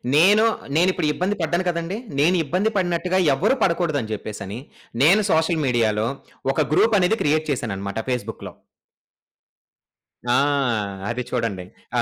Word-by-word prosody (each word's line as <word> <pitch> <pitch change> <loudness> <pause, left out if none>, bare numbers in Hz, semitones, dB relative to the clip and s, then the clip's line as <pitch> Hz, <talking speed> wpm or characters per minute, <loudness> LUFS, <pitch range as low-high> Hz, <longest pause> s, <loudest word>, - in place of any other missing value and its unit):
నేను 200 +8 +5 0.3
నేనిప్పుడు 180 -1 +2
ఇబ్బంది 185 +7 -1
పడ్డాను 170 +3 0
కదండీ. 170 +3 -2 0.2
నేను 175 +5 +4
ఇబ్బంది 185 +9 0
పడినట్టుగా 180 0 0 0.2
ఎవ్వరు 135 - +2
పడకూడదని 155 - 0
జెప్పేసని 105 0 -6 0.4
నేను 190 +8 +5
సోషల్ 160 0 +1
మీడియా‌లో 110 -3 +1 0.5
ఒక - - 0
గ్రూప్ 220 +6 +4
అనేది 185 +5 +2
క్రియేట్ 155 +1 +1
చేశాననమాట 100 -6 -3
ఫేస్‌బుక్‌లో. 125 -1 -4 1.8
ఆ! 120 - +3 0.7
అది 125 +2 -2
చూడండి. 110 -7 -2 0.3
ఆ! - - +3
155 Hz, 120 wpm, -22 LUFS, 120-180 Hz, 1.8 s, నేను